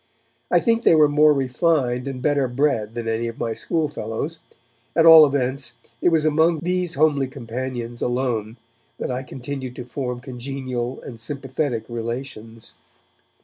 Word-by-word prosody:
I -, -, +4 dB
think 230 Hz, -1 st, +2 dB
they 165 Hz, -, +5 dB
were 155 Hz, -1 st, +6 dB
more 150 Hz, +1 st, +5 dB
refined 135 Hz, -2 st, +1 dB
and 130 Hz, -2 st, -5 dB
better 145 Hz, -3 st, +2 dB
bred 120 Hz, -4 st, 0 dB
than 120 Hz, -1 st, -4 dB
any 115 Hz, +1 st, -1 dB
of 115 Hz, -, -6 dB
my 115 Hz, -, -2 dB
schoolfellows, 150 Hz, 0 st, -3 dB, 0.6 s
at 165 Hz, -, +4 dB
all 160 Hz, -2 st, +10 dB
events 130 Hz, -2 st, -1 dB, 0.3 s
it -, -, +4 dB
was 160 Hz, -2 st, +2 dB
among 160 Hz, +1 st, +3 dB
these 180 Hz, 0 st, -1 dB
homely 145 Hz, -2 st, +2 dB
companions 120 Hz, -2 st, -5 dB
alone 120 Hz, -3 st, -1 dB, 0.4 s
that -, -, -3 dB
I 125 Hz, +1 st, -2 dB
continued 130 Hz, -1 st, -6 dB
to 125 Hz, -, -7 dB
form 125 Hz, -1 st, -4 dB
congenial 130 Hz, -1 st, -5 dB
and 115 Hz, -3 st, -9 dB
sympathetic 135 Hz, -1 st, -3 dB
relations. 115 Hz, -1 st, -6 dB
130 Hz, 145 wpm, -22 LUFS, 120-150 Hz, 0.6 s, all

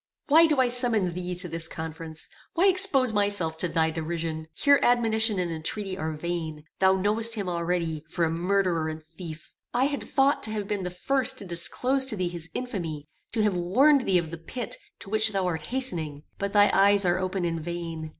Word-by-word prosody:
"Why 325 Hz, +3 st, +7 dB
do 300 Hz, -4 st, +1 dB
I 255 Hz, -, +4 dB
summon 240 Hz, -7 st, +1 dB
thee 180 Hz, 0 st, -4 dB
to 180 Hz, +1 st, -6 dB
this 165 Hz, -1 st, -3 dB
conference? 160 Hz, -1 st, -5 dB, 0.3 s
Why 350 Hz, +3 st, +3 dB
expose 360 Hz, -, +4 dB
myself 200 Hz, -6 st, 0 dB
to 180 Hz, -, 0 dB
thy 160 Hz, -1 st, +1 dB
derision? 160 Hz, 0 st, -4 dB
Here 285 Hz, -, +4 dB
admonition 225 Hz, -3 st, +3 dB
and 175 Hz, -2 st, -1 dB
entreaty 185 Hz, +5 st, -2 dB
are 160 Hz, -2 st, -4 dB
vain. 160 Hz, -2 st, -4 dB, 0.2 s
Thou 190 Hz, 0 st, +4 dB
knowest 215 Hz, +4 st, +3 dB
him 200 Hz, -3 st, -4 dB
already, 170 Hz, -3 st, -2 dB
for 170 Hz, -, 0 dB
a 160 Hz, -, -1 dB
murderer 175 Hz, -2 st, 0 dB
and 155 Hz, 0 st, -7 dB
thief. 160 Hz, 0 st, -10 dB, 0.2 s
I 250 Hz, +2 st, +3 dB
had 285 Hz, 0 st, -2 dB
thought 275 Hz, +1 st, +1 dB
to 215 Hz, -, +1 dB
have 205 Hz, -2 st, -3 dB
been 205 Hz, -1 st, -2 dB
the 180 Hz, -, -3 dB
first 265 Hz, +8 st, 0 dB
to 200 Hz, -, -8 dB
disclose 250 Hz, +10 st, +2 dB
to 260 Hz, -5 st, -2 dB
thee 180 Hz, -3 st, -2 dB
his 170 Hz, -2 st, -6 dB
infamy; 170 Hz, -, -5 dB, 0.3 s
to 220 Hz, -2 st, +1 dB
have 210 Hz, -2 st, +2 dB
warned 250 Hz, +11 st, +3 dB
thee 185 Hz, -, +4 dB
of 165 Hz, -2 st, -2 dB
the 170 Hz, -, -7 dB
pit 235 Hz, +7 st, -6 dB, 0.3 s
to -, -, -10 dB
which 220 Hz, 0 st, +5 dB
thou 195 Hz, -1 st, 0 dB
art 160 Hz, -4 st, -3 dB
hastening; 165 Hz, -, -2 dB, 0.2 s
but 200 Hz, 0 st, -2 dB
thy 205 Hz, -1 st, +5 dB
eyes 200 Hz, 0 st, +4 dB
are 175 Hz, +1 st, +2 dB
open 185 Hz, -1 st, -2 dB
in 165 Hz, -1 st, -2 dB
vain. 165 Hz, -1 st, -6 dB
185 Hz, 205 wpm, -26 LUFS, 165-225 Hz, 0.3 s, Why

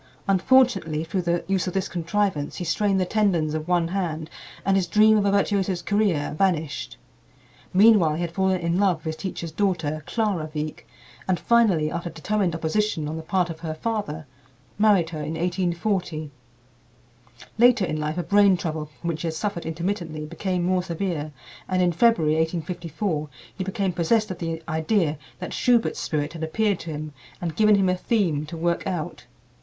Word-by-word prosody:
Unfortunately, 195 Hz, -6 st, +3 dB
through 185 Hz, +3 st, -2 dB
the 175 Hz, 0 st, -1 dB
use 195 Hz, -1 st, 0 dB
of 180 Hz, -, -3 dB
this 190 Hz, -, 0 dB
contrivance 170 Hz, -3 st, -1 dB
he -, -, -4 dB
strained 195 Hz, +3 st, +1 dB
the 185 Hz, -, +1 dB
tendons 180 Hz, -7 st, +1 dB
of 155 Hz, +1 st, -3 dB
one 175 Hz, -2 st, +2 dB
hand 165 Hz, -4 st, -3 dB, 0.3 s
and 195 Hz, -, +3 dB
his 190 Hz, -2 st, +1 dB
dream 215 Hz, +4 st, +5 dB
of 205 Hz, -1 st, +2 dB
a 200 Hz, -, +3 dB
virtuoso's 195 Hz, -3 st, +1 dB
career 200 Hz, -9 st, +1 dB
vanished. 160 Hz, -4 st, -1 dB, 0.7 s
Meanwhile 190 Hz, -6 st, +5 dB
he 165 Hz, -, -3 dB
had 170 Hz, -1 st, -2 dB
fallen 190 Hz, 0 st, +1 dB
in 170 Hz, +2 st, 0 dB
love 195 Hz, -3 st, +3 dB
with 155 Hz, -, -22 dB
his -, -, -9 dB
teacher's 170 Hz, -3 st, -5 dB
daughter, 160 Hz, -5 st, -1 dB
Clara 200 Hz, -9 st, -1 dB
Wieck, 150 Hz, 0 st, -4 dB, 0.4 s
and 185 Hz, -2 st, +1 dB
finally, 195 Hz, -10 st, +3 dB
after 170 Hz, 0 st, -3 dB
determined 175 Hz, +3 st, -1 dB
opposition 165 Hz, 0 st, -1 dB
on 155 Hz, -, -4 dB
the 160 Hz, -, -4 dB
part 175 Hz, +1 st, 0 dB
of 160 Hz, -, -9 dB
her 160 Hz, -2 st, -4 dB
father, 200 Hz, -6 st, -3 dB, 0.5 s
married 200 Hz, -6 st, +4 dB
her 155 Hz, -, -5 dB
in 155 Hz, +2 st, -4 dB
1840. 175 Hz, -2 st, -1 dB, 1.3 s
Later 240 Hz, -4 st, +5 dB
in 155 Hz, -3 st, -3 dB
life 155 Hz, +2 st, -2 dB
a 175 Hz, -, -1 dB
brain 200 Hz, +2 st, +4 dB
trouble 155 Hz, -3 st, -4 dB
from 170 Hz, -, -5 dB
which 160 Hz, -2 st, -3 dB
he 170 Hz, -, -2 dB
had 160 Hz, -, -3 dB
suffered 175 Hz, -1 st, -3 dB
intermittently 165 Hz, -2 st, -3 dB
became 180 Hz, +3 st, -2 dB
more 185 Hz, +1 st, +2 dB
severe, 170 Hz, -3 st, -3 dB, 0.4 s
and 185 Hz, 0 st, +1 dB
in 175 Hz, -, +3 dB
February, 170 Hz, -5 st, +3 dB
1854, 165 Hz, 0 st, -2 dB, 0.3 s
he 190 Hz, -, -3 dB
became 195 Hz, -1 st, -1 dB
possessed 215 Hz, +6 st, +1 dB
of 185 Hz, -, -6 dB
the 165 Hz, -1 st, -4 dB
idea 160 Hz, -1 st, 0 dB, 0.2 s
that 180 Hz, -, -6 dB
Schubert's 240 Hz, -2 st, +2 dB
spirit 150 Hz, 0 st, -2 dB
had 165 Hz, -, -8 dB
appeared 200 Hz, +4 st, 0 dB
to 170 Hz, -, -7 dB
him 155 Hz, -1 st, -5 dB, 0.3 s
and 170 Hz, -3 st, -4 dB
given 215 Hz, -1 st, +5 dB
him 195 Hz, -1 st, +2 dB
a 185 Hz, -, +2 dB
theme 180 Hz, -8 st, 0 dB
to 165 Hz, -, -7 dB
work 170 Hz, +2 st, -1 dB
out. 175 Hz, -6 st, -4 dB
175 Hz, 180 wpm, -24 LUFS, 160-195 Hz, 1.3 s, dream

